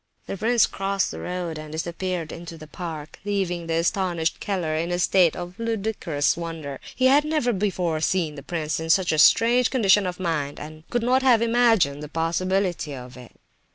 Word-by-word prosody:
The - - -5
prince 230 +3 +3
crossed 195 0 -1
the - - -7
road, 175 -3 -4
and 155 0 -9
disappeared 170 +1 -3
into 165 0 -8
the 155 - -10
park, 155 -2 -7
leaving 185 -4 -2
the 165 - 0
astonished 170 -1 0
Keller 180 -6 -2
in 165 +2 -1
a 175 - 0
state 180 -2 +3
of 180 +2 -8
ludicrous 210 -10 -1
wonder. 160 -5 -6 0.2
He 255 - +1
had 280 +3 +5
never 300 -6 0
before 180 -5 -1
seen 160 -1 0
the 145 - -9
prince 155 +1 -3
in 160 0 -5
such 180 +2 +3
a 155 - 0
strange 240 +8 +5
condition 205 -6 +3
of 180 0 -5
mind, 155 -5 -2
and 155 +2 -11
could 240 -1 -1
not 255 +2 +3
have 245 -4 +4
imagined 225 -12 +3
the 150 - -7
possibility 170 -1 -1
of 125 0 -10
it. 125 -2 -13
175 Hz, 190 wpm, -24 LUFS, 160-200 Hz, 0.2 s, had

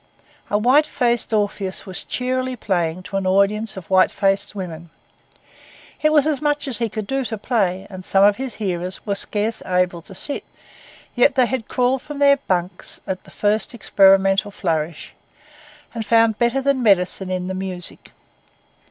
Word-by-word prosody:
A 205 - +2
white 260 +8 +4
faced 240 -5 0
Orpheus 205 -3 -1
was 185 -2 -4
cheerily 255 0 -2
playing 180 -5 -2
to 195 - -4
an 195 -1 -1
audience 200 +3 +1
of 185 - -8
white 185 0 +5
faced 195 +1 0
women. 170 -3 -7 1.1
It 305 - +3
was 300 -2 +4
as 300 -3 0
much 295 -1 0
as 245 -5 +1
he 230 -1 0
could 215 0 -5
do 270 +5 -1
to 220 - -4
play, 195 -4 -1
and 185 -2 -9
some 195 +1 +3
of 205 0 +5
his 260 -1 -5
hearers 185 -3 -4
were 200 - 0
scarce 210 +2 -1
able 180 -2 0
to 190 - -12
sit; 285 - -1 0.7
yet 245 - +3
they 255 -1 +4
had 245 -2 -3
crawled 250 +1 +1
from 295 - -8
their 280 0 +5
bunks 185 -7 -2
at 190 -1 -5
the - - -15
first 215 +3 0
experimental 195 -1 +4
flourish, 165 -5 -3 0.8
and 230 -1 -3
found 225 -1 +3
better 240 +3 +1
than 275 -1 +1
medicine 190 -3 +2
in 185 -1 -2
the 190 - -4
music. 185 -2 -5
205 Hz, 170 wpm, -21 LUFS, 185-245 Hz, 1.1 s, white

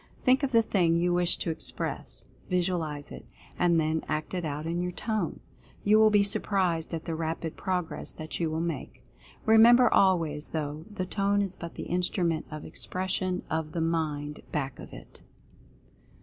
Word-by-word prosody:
Think 260 +2 +4
of 275 -2 -1
the 230 -2 +5
thing 175 -6 +2
you 175 +1 +2
wish 175 0 +3
to 165 - -2
express 160 - -2
— - - -28
visualize 170 -5 -1
it - - -10 0.2
— - - -23
and 170 -2 +4
then 160 0 0
act 155 +3 -3
it 180 -1 -2
out 150 0 -4
in 170 +2 -1
your 180 0 -2
Tone. 215 -2 -3 0.4
You 210 +1 +5
will 220 0 +7
be 205 -1 +4
surprised 190 -5 +3
at 165 -2 -4
the 165 - -3
rapid 160 0 -3
progress 180 -3 -3
that 155 0 -7
you 165 -2 0
will 160 +1 -2
make. 165 -4 -5 0.4
Remember 235 +3 +7
always, 165 -6 +2
though, 155 0 -4
the 205 -3 -4
Tone 200 +1 +1
is 195 -2 -4
but 170 -1 -8
the - - -5
Instrument 175 -2 -1
of 155 -1 -7
Expression 185 0 -1
of 160 -1 -3
the 170 - -2
MIND 155 -3 -1
back 135 -3 -3
of - - -10
it. - - -12
170 Hz, 180 wpm, -28 LUFS, 160-190 Hz, 0.4 s, will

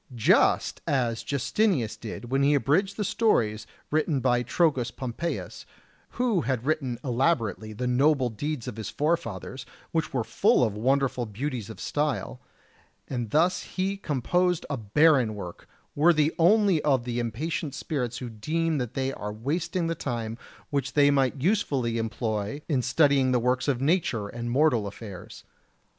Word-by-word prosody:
Just 115 - +3
as 120 -5 0
Justinius 140 - 0
did 115 +2 -8
when 135 +1 +2
he 145 +1 +4
abridged 185 +8 +1
the 210 - 0
stories 115 - +1 0.2
written 155 -1 +1
by 125 -1 +2
Trogus 130 -1 +1
Pompeius, 130 +7 -5 0.5
who 235 -8 +2
had 130 -4 -2
written 135 -5 -1
elaborately 120 - 0
the 110 +4 -4
noble 130 0 +2
deeds 140 +2 -4
of 120 -4 -6
his 110 -3 -5
forefathers, 130 - -2 0.3
which 160 -1 -1
were 125 -4 0
full 125 - +3
of 110 -4 +1
wonderful 130 +2 0
beauties 115 0 -4
of 110 - -9
style; 145 -3 -2 0.7
and 120 -4 -3
thus 170 - +2
he 190 +1 -2
composed 180 - 0
a - - 0
barren 125 +1 +3
work, 90 -4 -9 0.2
worthy 155 0 +3
only 195 -1 +4
of 135 -5 +2
the 120 0 -3
impatient 140 +5 -3
spirits 125 -5 -3
who 125 - -5
deem 155 +8 -1
that 125 -3 -4
they 135 0 -1
are 105 0 -5
wasting 160 - -2
the 165 - 0
time 115 -7 -4 0.4
which 140 -1 -1
they 145 -1 +5
might 135 -1 +1
usefully 140 - +1
employ 110 +1 -2
in 140 -7 +1
studying 135 +1 +3
the 125 - +3
works 125 +3 0
of 135 -4 +1
nature 135 - +1
and 120 +1 -5
mortal 125 -5 +2
affairs. 100 -2 -9
130 Hz, 150 wpm, -27 LUFS, 115-155 Hz, 0.7 s, they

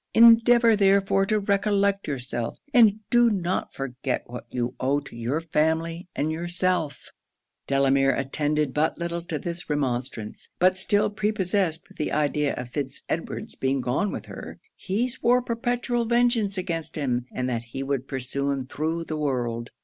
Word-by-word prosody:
Endeavour 230 0 +7
therefore 195 -1 +3
to 215 0 +2
recollect 200 0 +1
yourself, 125 -4 -3 0.2
and 215 -4 +5
do 240 -1 +6
not 185 -3 -1
forget 130 -1 -3
what 125 +1 -9
you 120 0 -2
owe 135 +3 +1
to 140 - -12
your 120 +6 -1
family 165 +2 0
and 155 +2 0
yourself.' 175 -1 -2 0.6
Delamere 135 0 +3
attended 145 +1 -1
but 155 +2 +1
little 170 0 -3
to 165 -2 -4
this 170 +3 -5
remonstrance; 125 -6 -3
but 185 +1 +3
still 205 +2 +2
prepossessed 200 -5 0
with - - -19
the 150 - -1
idea 150 -1 +1
of 125 -1 -6
Fitz 140 -2 -4
Edward's - - -3
being 135 +1 0
gone 130 +11 0
with - - -6
her, - - -9 0.2
he 210 +6 -1
swore 250 -1 +2
perpetual 240 0 -1
vengeance 235 -4 +2
against 170 -3 -3
him, 125 -5 -1
and 125 0 -2
that 120 -2 -2
he 135 +4 -5
would 135 -1 -2
pursue 135 +1 -2
him 135 -2 -1
through 160 +5 -2
the 155 -1 -4
world. 120 -5 -2
160 Hz, 155 wpm, -25 LUFS, 135-200 Hz, 0.6 s, Endeavour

